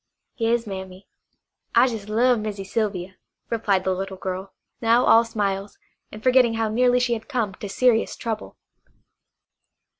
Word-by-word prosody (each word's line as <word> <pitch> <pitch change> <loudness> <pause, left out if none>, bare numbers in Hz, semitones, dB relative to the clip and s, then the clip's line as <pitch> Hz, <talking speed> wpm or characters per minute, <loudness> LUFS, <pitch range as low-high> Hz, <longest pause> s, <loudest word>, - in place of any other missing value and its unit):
"Yas, 230 0 +1
Mammy. 190 -1 -8 0.7
I - - +7
jes' 220 -5 -4
love 240 +2 +3
Missy 210 -2 -4
Sylvia," 195 -3 -3 0.3
replied 205 -5 +1
the 190 - +1
little 190 +1 -5
girl, 190 +1 -5 0.3
now 230 +2 +4
all 230 - +6
smiles, 200 -3 -3 0.3
and 215 +1 -10
forgetting 250 -3 +4
how 225 -1 0
nearly 245 +2 +3
she 245 -1 +1
had 220 +2 -6
come 230 -8 -1
to 200 +1 -8
serious 230 +2 +2
trouble. 220 -2 -5
215 Hz, 145 wpm, -23 LUFS, 195-235 Hz, 0.7 s, I